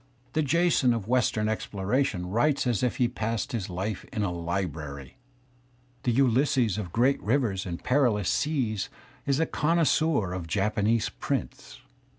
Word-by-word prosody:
The 155 - +2
Jason 150 -4 +3
of 110 -3 -5
western 115 -3 +1
exploration 105 -1 -1
writes 120 +11 +1
as 120 -4 +1
if 125 -2 0
he - - +2
had 120 0 0
passed 115 -3 -2
his 110 -6 -3
life 95 +3 -3
in 105 - -1
a 95 - 0
library. 80 - -4 0.8
The 120 - +1
Ulysses 125 -3 +2
of 90 -5 -5
great 125 +7 +2
rivers 105 -6 0
and 85 -1 -5
perilous 120 -7 +2
seas 120 -10 0 0.4
is 140 +1 +2
a 165 - +3
connoisseur 155 - +1
of 90 -2 -5
Japanese 105 +5 +1
prints. - - -5
115 Hz, 150 wpm, -27 LUFS, 95-135 Hz, 0.8 s, Jason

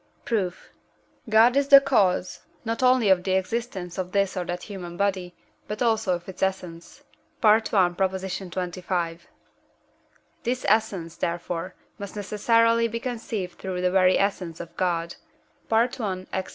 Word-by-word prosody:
Proof. 195 -6 -2 0.6
God 225 +3 +5
is 280 0 +2
the 280 -1 +10
cause, 205 -10 +1 0.3
not 225 +2 -2
only 255 -4 +4
of 185 -2 +4
the 190 - 0
existence 190 -2 -3
of 185 0 -4
this 195 -1 +1
or 180 - -1
that 175 +1 -4
human 180 -4 -8
body, 190 -3 -1 0.3
but 210 0 -5
also 220 -5 +2
of 175 0 -9
its 190 - -9
essence 180 -3 -4 0.4
(I. 215 0 +7
xxv.). 185 -3 -1 1.2
This 250 +1 -2
essence, 195 -6 0
therefore, 175 +1 -3 0.2
must 200 0 -7
necessarily 230 +3 +2
be 230 +1 -4
conceived 225 -7 -5
through 185 -1 -4
the 180 0 +1
very 185 -1 +4
essence 185 -4 -1
of 170 - -9
God 170 -2 -1 0.5
(I. 225 -5 0
Ax. 190 0 -2
190 Hz, 140 wpm, -25 LUFS, 180-225 Hz, 1.2 s, the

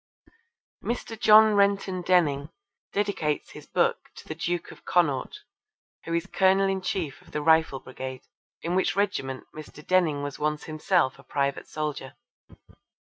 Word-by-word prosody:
Mr. 235 -1 -3
John 215 0 +7
Renton 200 -2 +2
Denning 155 -6 +2 0.4
dedicates 195 -7 -1
his - - -12
book - - 0
to - - -13
the - - -4
Duke 170 +2 -3
of - - -15
Connaught, 155 -7 0 0.6
who 165 - -3
is 170 +1 0
Colonel 195 0 +3
in 195 0 -1
Chief 185 -8 -3
of - - -19
the 150 - -1
Rifle 160 -3 +4
Brigade, 130 0 -8 0.4
in 170 - -1
which 190 +1 +1
regiment 135 -10 -1
Mr. 150 0 -11
Denning 165 -6 +2
was 145 -1 -5
once 150 0 -1
himself 155 -3 0
a - - -14
private 140 -1 -2
soldier. 150 -3 -4
165 Hz, 145 wpm, -26 LUFS, 145-190 Hz, 0.6 s, John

